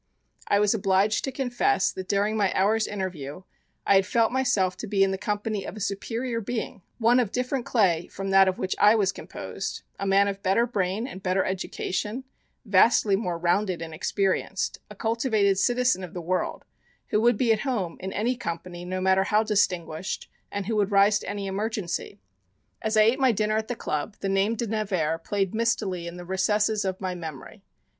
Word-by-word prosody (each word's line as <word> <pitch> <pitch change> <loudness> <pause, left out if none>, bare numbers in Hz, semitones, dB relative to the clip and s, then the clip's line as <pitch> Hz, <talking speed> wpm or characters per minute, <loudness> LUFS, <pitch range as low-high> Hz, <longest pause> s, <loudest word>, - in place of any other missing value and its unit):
I 200 - +3
was 205 +1 +3
obliged 195 0 +2
to 270 - -3
confess 265 +10 +1
that 185 -1 -7
during 205 +2 +1
my 200 -3 +2
hour's 215 +3 +2
interview 185 -5 -5 0.4
I - - +4
had 195 - +3
felt 230 +1 +2
myself 205 -8 +1
to - - -6
be 195 -1 +3
in 195 - +2
the - - 0
company 210 0 -2
of 215 - -7
a - - -6
superior 230 +4 -3
being, 220 -2 -4 0.2
one 240 +2 +4
of 230 -5 0
different 250 0 -2
clay 175 -8 +2
from 195 0 -5
that 195 0 +6
of 185 - 0
which 185 - -2
I 210 +2 +6
was 200 -3 +2
composed, - - -6 0.2
a 195 - -2
man 195 +1 +4
of 200 0 -4
better 195 +5 +2
brain, 205 -1 -1
and 195 -8 -8
better 185 0 +1
education, 195 +5 -3 0.4
vastly 200 0 +4
more 180 -4 -2
rounded 180 +2 +1
and 165 -1 -7
experienced, 195 +3 -1
a 210 - -10
cultivated 220 -3 +1
citizen 245 -3 +2
of 180 +1 -8
the - - -3
world, 180 +2 -2 0.4
who 210 - +2
would 235 -1 +4
be 235 -2 +3
at 215 - -1
home 215 -11 -2
in 190 +1 -5
any 230 +6 0
company 175 -5 -6
no 185 +1 -3
matter 190 +1 +3
how 210 +2 +3
distinguished 185 -5 -1 0.2
and 200 -1 -3
who 220 +2 -1
would 200 -2 +2
rise 205 +1 +4
to - - -7
any 200 -1 -4
emergency. 200 -1 -3 0.6
As 220 0 0
I 215 - +7
ate 230 +5 +3
my 260 -2 +4
dinner 215 0 0
at 220 0 -1
the 245 - -3
club 155 +2 -3
the 195 - -1
name 195 +3 +2
De 235 - -2
Nevers 190 -8 -1
played 195 -2 -1
mistily 210 -6 -1
in 170 +1 -7
the 175 - -8
recesses 210 +3 +1
of 190 -1 -2
my 185 -1 -2
memory. 160 -6 -8
200 Hz, 195 wpm, -26 LUFS, 185-220 Hz, 0.6 s, I